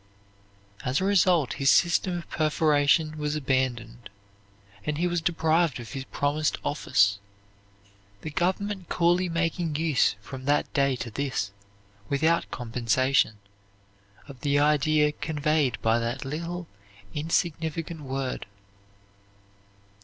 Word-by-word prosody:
As 130 +3 0
a - - -2
result 180 -7 +3
his 135 - +4
system 175 +6 +3
of 170 - -8
perforation 155 0 +2
was 150 0 -1
abandoned 125 -5 -2 0.7
and 150 -1 -2
he 175 - 0
was 175 -1 0
deprived 165 -3 +1
of 120 - -9
his 135 -1 -5
promised 145 +3 -1
office, 100 -9 +2 1.0
the 155 - -6
government 190 +3 -1
coolly 175 +1 +2
making 165 -1 -1
use 150 -9 +2
from 130 +6 -9
that 145 +1 +1
day 140 -2 +2
to 120 -2 -6
this, 130 -5 -2 0.6
without 160 +4 +1
compensation, 125 0 +1 0.9
of 135 -3 -11
the 145 -1 +1
idea 150 +1 +3
conveyed 150 -6 0
by 115 +1 +3
that 120 +3 -3
little 170 +5 -4 0.5
insignificant 160 +1 -2
word. 135 -4 -4
150 Hz, 115 wpm, -26 LUFS, 130-165 Hz, 1.0 s, his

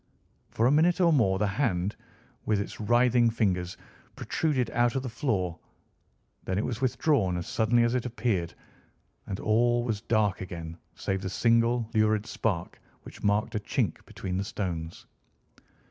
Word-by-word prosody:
For 115 - 0
a 125 - +5
minute 165 +5 +3
or 170 -3 +5
more 100 -9 +3
the 105 - +1
hand, 100 -3 0 0.5
with 105 -2 +2
its 100 - -5
writhing 120 +2 +4
fingers, 90 -5 -1 0.4
protruded 135 -7 -1
out 120 0 +2
of 130 - -1
the 130 - -4
floor. 100 - -1 0.8
Then 95 - -2
it 105 - 0
was 120 -2 -4
withdrawn 125 - +1
as 85 - -4
suddenly 120 +1 +2
as 120 0 +1
it 125 -1 -1
appeared, 110 -8 -1 0.7
and 95 - -4
all 120 +2 +2
was 110 -4 -2
dark 110 -4 +1
again 85 -3 -6 0.2
save 95 -1 -2
the 95 - -3
single 115 +3 +2
lurid 110 -1 +2
spark 95 -8 -3 0.2
which - - -12
marked 105 +1 +1
a 105 - 0
chink 105 - -2
between 90 -1 -4
the 95 - -1
stones. 85 -5 -5
110 Hz, 160 wpm, -28 LUFS, 95-120 Hz, 0.8 s, a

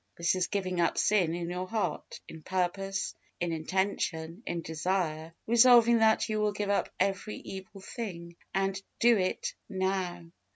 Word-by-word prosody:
This 170 0 +2
is 185 -1 0
giving 185 -3 -1
up 170 - +1
sin 185 -6 +3
in 170 -1 -3
your 180 +1 -3
heart, 195 -7 -3
in 160 - -10
purpose, 195 +2 -1 0.3
in 175 -1 -1
intention, 165 0 -2
in 170 -1 -2
desire, 160 -1 -2
resolving 235 0 +6
that 220 0 +4
you 215 -1 -1
will 210 -1 +1
give 205 0 -1
up 200 - +1
every 195 +2 0
evil 190 +1 -9
thing, 170 -6 -6 0.2
and 195 0 0 0.2
DO 235 0 +6
IT 225 - -1 0.2
NOW. 185 -3 -2
190 Hz, 155 wpm, -30 LUFS, 170-205 Hz, 0.3 s, resolving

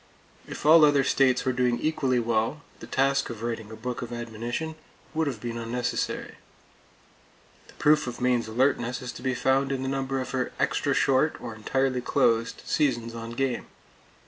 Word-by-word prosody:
If - - -7
all 160 +1 +8
other 145 -2 +5
states 130 -2 +2
were 130 - +1
doing 125 -1 +1
equally 140 -5 +1
well, 115 +4 0 0.2
the - - -10
task 135 0 +1
of 115 -1 -7
writing 115 -2 -3
a 110 - -8
book 120 +2 -5
of 120 - -6
admonition 120 +6 -4 0.4
would 160 -1 0
have 125 -6 -3
been 115 +1 -4
unnecessary. 120 +1 -3 1.3
The - - -17
proof 150 -2 +3
of 120 - -5
Maine's 125 -2 +1
alertness 125 +1 0
is 125 - -4
to - - -10
be 130 -1 -1
found 135 +1 +2
in 135 -1 -2
the - - -2
number 135 0 -1
of 130 - -4
her 130 -1 -2
extra - - +1
short, 135 +4 +2
or 120 -2 -6
entirely 130 +4 0
closed, 115 -3 +1
seasons 120 -5 0
on 115 0 -6
game. 130 0 -1
125 Hz, 175 wpm, -27 LUFS, 115-135 Hz, 1.3 s, all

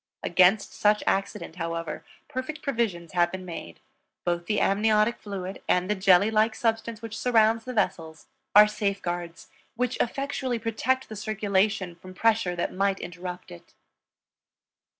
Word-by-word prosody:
Against 185 +4 +3
such 210 0 +2
accident, 195 -3 -2
however, 165 -2 -4 0.2
perfect 295 +3 -5
provisions 220 - -1
have 175 -1 +2
been 185 -1 -6
made; 125 - -8 0.5
both 175 -1 -1
the 210 - +1
amniotic 215 +3 +2
fluid 195 -2 -6
and 180 +2 +2
the - - +4
jelly 195 +1 +4
like 220 +1 +2
substance 225 0 -1
which 225 -1 -6
surrounds 225 -1 +3
the 255 - -5
vessels 160 -7 -2 0.3
are 210 +1 +10
safeguards 175 -5 -3 0.3
which 250 +1 -1
effectually 265 0 -1
protect 230 +4 -1
the 220 - -8
circulation 205 -3 0
from 185 +2 -13
pressure 220 -4 +2
that 170 - -2
might 195 +1 +1
interrupt 180 +1 -7
it. 85 - -14
205 Hz, 140 wpm, -26 LUFS, 180-225 Hz, 0.5 s, are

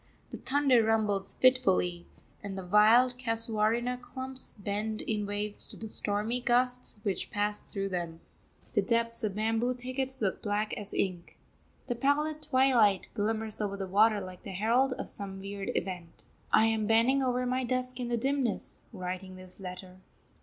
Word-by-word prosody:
The - - -7
thunder 270 -3 +3
rumbles 215 -3 0
fitfully, 190 -9 +2 0.3
and 200 -2 -6
the 190 - -6
wild 230 +6 +5
casuarina 230 +1 +2
clumps 260 +1 -6
bend 210 +2 -3
in 210 -2 -2
waves 205 0 0
to - - -7
the 220 - -6
stormy 215 +3 -1
gusts 250 -1 +2
which 195 -3 -2
pass 205 0 +1
through 195 -1 -4
them. 170 -3 -4 0.5
The - - +3
depths 230 0 0
of 205 -3 -1
bamboo 225 +3 0
thickets 255 +1 -3
look 195 -4 -1
black 210 +1 -1
as 205 -1 -3
ink. 180 -3 -3 0.5
The 245 - -1
pallid 295 +5 0
twilight 250 -9 +3
glimmers 220 0 -2
over 200 -1 -2
the 195 - -3
water 210 +3 +4
like 185 -2 -9
the 195 - -8
herald 235 +7 +2
of - - -6
some 195 -1 -7
weird 195 0 -6
event. 175 -3 -5 0.3
I 220 - +5
am 220 -1 +1
bending 230 +5 +4
over 250 -1 0
my 255 +1 0
desk 255 0 -2
in 245 - -2
the 240 0 0
dimness, 265 -2 -1
writing 185 -1 -6
this 185 +1 -11
letter. 185 0 -8
220 Hz, 160 wpm, -30 LUFS, 200-250 Hz, 0.5 s, wild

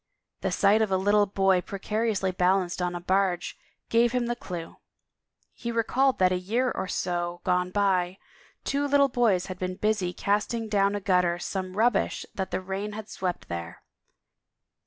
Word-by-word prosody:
The - - -2
sight 210 +2 +4
of 220 - +2
a 190 - +2
little 205 +2 +3
boy 195 -2 +2
precariously 205 0 -1
balancing 180 0 +1
on 175 - -4
a - - -3
barge 185 -1 0 0.3
gave 235 +1 +3
him 250 -1 +1
the 240 0 -1
clue.... 175 -8 -7 0.8
He 235 - -5
recalled 250 +4 +2
that 185 -1 +4
a 180 - +1
year 235 +8 0
or - - -3
so 175 -1 -2
gone 180 0 +1
by, 185 -2 +1 0.5
two 285 +1 0
little 280 0 +4
boys 220 -8 +2
had 185 -1 -7
been 185 0 -3
busy 210 -3 0
casting 210 +5 -1
down 200 -1 +2
a - - -1
gutter 180 -3 +2
some 185 +1 -4
rubbish 230 -2 +1
that 190 -1 -3
the - - -2
rain 195 +3 -4
had 215 0 -7
swept 180 -2 -4
there. 85 -1 -6
195 Hz, 170 wpm, -27 LUFS, 180-220 Hz, 0.8 s, sight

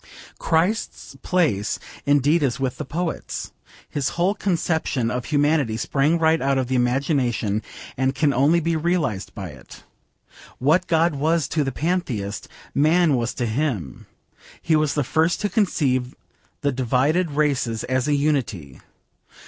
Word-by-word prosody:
Christ's 170 -2 -1
place 145 - +1 0.3
indeed 145 +3 +3
is 135 -3 0
with 130 -2 -2
the - - -5
poets. 170 +2 -4 0.4
His 145 -3 -2
whole 180 +3 +2
conception 160 - -1
of 125 0 -3
Humanity 145 -6 +1
sprang 145 +7 +1
right 160 0 +2
out 135 0 +1
of 130 - +1
the 130 - -3
imagination 125 -4 +1 0.3
and 130 +1 0
can 140 0 +2
only 145 +7 +3
be 165 0 0
realised 155 - -1
by 95 -5 -6
it. 65 -4 -13 0.7
What 160 +8 +2
God 165 0 +2
was 155 +1 +1
to 155 - +1
the 135 - -2
pantheist, 130 - -2 0.3
man 160 +2 +3
was 120 -1 -2
to 120 - -1
Him. 110 - -3 0.5
He 160 - +1
was 155 -2 +1
the 145 - +1
first 160 +6 +1
to 205 - 0
conceive 135 - 0 0.5
the 145 -2 +1
divided 135 +7 +1
races 140 -6 0
as 130 +1 -1
a 145 - +2
unity. 130 - -1
145 Hz, 145 wpm, -23 LUFS, 125-160 Hz, 0.7 s, indeed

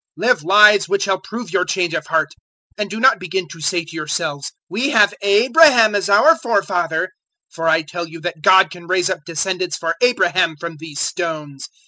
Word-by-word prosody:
003:008 - - -2
Live - - +3
lives 205 +3 +5
which 200 0 0
shall 190 -1 -1
prove 220 -1 -8
your - - +2
change 180 -2 -2
of - - -4
heart; 160 -2 0 0.5
and 210 -1 -4
do 215 +3 -6
not 260 +3 +4
begin 185 0 -4
to 165 - -13
say 165 +2 -1
to 165 0 -13
yourselves, 145 -3 -4 0.2
`We 255 +9 -1
have 205 -2 +4
Abraham 230 +3 +4
as 200 -1 -1
our 215 +12 +5
forefather,' 185 - -1 0.4
for 165 0 -4
I 160 0 +2
tell 170 +2 -7
you 165 +1 -11
that 170 -2 -6
God 190 +4 +5
can 175 -2 -12
raise 185 0 0
up - - -3
descendants 180 +2 -3
for 165 0 -2
Abraham 185 -9 +1
from 170 -1 -7
these 155 -2 -9
stones. 155 -6 -5
180 Hz, 195 wpm, -18 LUFS, 165-205 Hz, 0.5 s, lives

